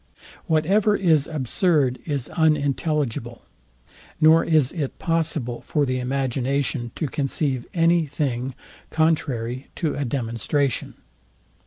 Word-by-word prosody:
Whatever 195 +7 +3
is 160 -7 +3
absurd 145 - +1
is 140 -5 -2
unintelligible; 145 -6 0 0.8
nor 160 +1 +6
is 155 -5 +3
it 150 -6 -4
possible 155 -7 -1
for 150 -1 0
the 130 -1 -1
imagination 130 -1 -1
to 160 - -2
conceive 135 -2 -1
any 165 -1 +3
thing 135 -3 -2 0.3
contrary 135 -6 0
to 160 -4 -1
a 145 - -2
demonstration. 130 +1 -1
145 Hz, 105 wpm, -23 LUFS, 130-160 Hz, 0.8 s, nor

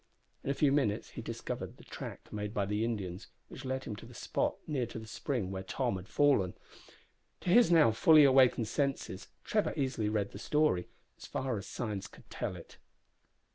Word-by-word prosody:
In - - -3
a 140 - +1
few 145 -1 +3
minutes 135 -8 +1
he - - -6
discovered - - -5
the - - -15
track - - -8
made 105 0 -4
by 100 - +1
the 105 +2 -1
Indians, 100 -5 -3 0.2
which 130 - -9
led 130 0 -2
him 105 - -5
to 115 - -10
the 120 - -13
spot - - -1
near 130 -6 -1
to - - -8
the 110 - -7
spring 110 -3 -3
where 95 -1 -3
Tom 95 +1 -1
had 95 +1 -9
fallen. 135 -11 +3 0.9
To 175 - 0
his 240 +5 +7
now 160 -10 +6
fully 155 +7 +7
awakened 130 -4 +5
senses 135 -7 -2 0.2
Trevor 210 -1 +1
easily 130 -7 0
read 105 -2 -1
the 100 - -9
story, 150 -10 +2 0.3
as - - -9
far 130 -2 -2
as 100 - -5
signs 105 -6 -4
could - - -17
tell - - -3
it. - - -13
115 Hz, 195 wpm, -32 LUFS, 100-140 Hz, 0.9 s, his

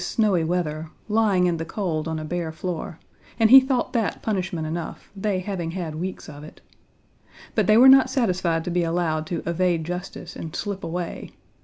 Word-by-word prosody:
Page - - -5
22 195 -8 +2
weather) 160 -3 -2 0.2
lying 210 -4 +2
in 175 -2 +1
the 165 - -3
cold 165 -3 -3
on 160 0 -2
a 155 - -5
bare 170 0 -3
floor, 165 0 -5 0.4
and 225 0 +4
he 270 - +12
thought 260 -1 -1
that 225 -4 -1
punishment 185 -6 -2
enough; 160 +1 -6
they 195 -1 -1
having 180 -4 -4
had 170 -2 -4
weeks 180 +4 -5
of 145 +1 -10
it. 155 - -12 0.9
But - - +1
they 215 0 +6
were 255 +3 +8
not 265 -1 +7
satisfied 185 - 0
to 175 - -4
be 175 +1 +1
allowed 165 -2 -1
to 170 -1 -3
evade 170 -1 +1
justice 180 +1 -6
and 160 -1 -7
slip 200 -2 -4
away. 170 +1 -5
175 Hz, 190 wpm, -24 LUFS, 165-200 Hz, 0.9 s, he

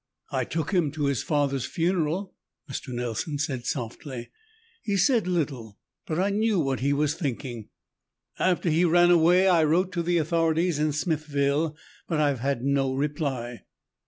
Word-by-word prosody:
"I - - 0
took 160 +1 -3
him 175 -5 +2
to 150 -1 -1
his 140 -4 0
father's 140 -3 0
funeral," 175 +2 -1 0.3
Mr. 135 - -6
Nelson 125 +5 -3
said 130 -4 -3
softly. 125 0 -5 0.5
"He 205 -4 -1
said 235 -3 +3
little, 135 - -2 0.3
but 155 - -2
I 195 +2 +2
knew 215 -1 +1
what 135 -4 0
he 140 +2 +1
was 145 +1 +1
thinking. 125 - -5 0.7
After 180 -2 +1
he 165 +3 +3
ran 175 +1 +5
away, 175 +3 +5
I 170 -4 +5
wrote 175 +5 +2
to 175 - -1
the 175 +1 +1
authorities 165 0 +1
in 155 0 +1
Smithville, 150 -1 0 0.3
but 160 - -1
I've 145 -4 +2
had 135 -1 -1
no 135 -1 +1
reply." 135 -4 -2
150 Hz, 160 wpm, -26 LUFS, 140-175 Hz, 0.7 s, ran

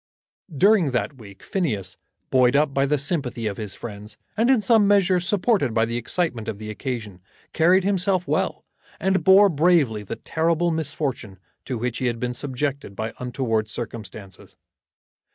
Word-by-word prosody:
During 195 -2 +4
that 130 +2 -2
week 100 -3 -13
Phineas, 110 - -2 0.4
buoyed 130 0 +4
up 145 -1 +2
by 135 0 +2
the 150 +1 +2
sympathy 135 -5 -3
of 100 -2 -2
his 105 -3 -4
friends, 105 -1 -9 0.2
and 225 +3 +2
in 265 -3 +5
some 210 0 +4
measure 195 -3 +4
supported 185 - +1
by 115 0 +3
the 115 +1 -4
excitement 120 -1 -2
of 105 - -4
the 110 0 -7
occasion, 110 -6 -5 0.3
carried 180 +4 +4
himself 185 -2 +1
well, - - -1 0.3
and 190 0 +1
bore 195 +2 +7
bravely 155 - +2
the 105 - -6
terrible 165 +1 0
misfortune 140 -10 -3 0.3
to 130 - -3
which 120 +1 -3
he 130 - 0
had 120 -1 -2
been 125 0 -2
subjected 135 -3 -3
by 110 +2 -4
untoward 120 -4 -1
circumstances. 105 -4 -8
135 Hz, 160 wpm, -23 LUFS, 115-175 Hz, 0.4 s, bore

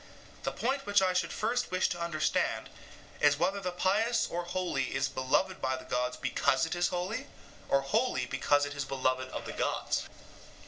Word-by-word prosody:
The - - -2
point 270 +1 -1
which 205 0 +5
I 185 -1 +3
should 180 - 0
first 240 +3 0
wish 185 0 +2
to 175 -1 -4
understand 165 -2 0 0.5
is 145 0 +5
whether 185 +5 +1
the 185 -2 -2
pious 205 +7 +2
or 175 0 -3
holy 175 -8 -1
is 135 0 +2
beloved 135 +8 0
by 130 0 +1
the 130 - -9
gods 125 0 -1
because 135 +3 +2
it 165 - -3
is 175 0 +2
holy, 195 +10 -3 0.4
or 140 - +4
holy 220 - +1
because 145 0 +2
it 145 - -5
is 145 -1 -2
beloved 130 -1 -1
of - - -6
the - - -5
gods. - - -1
175 Hz, 185 wpm, -31 LUFS, 135-190 Hz, 0.5 s, which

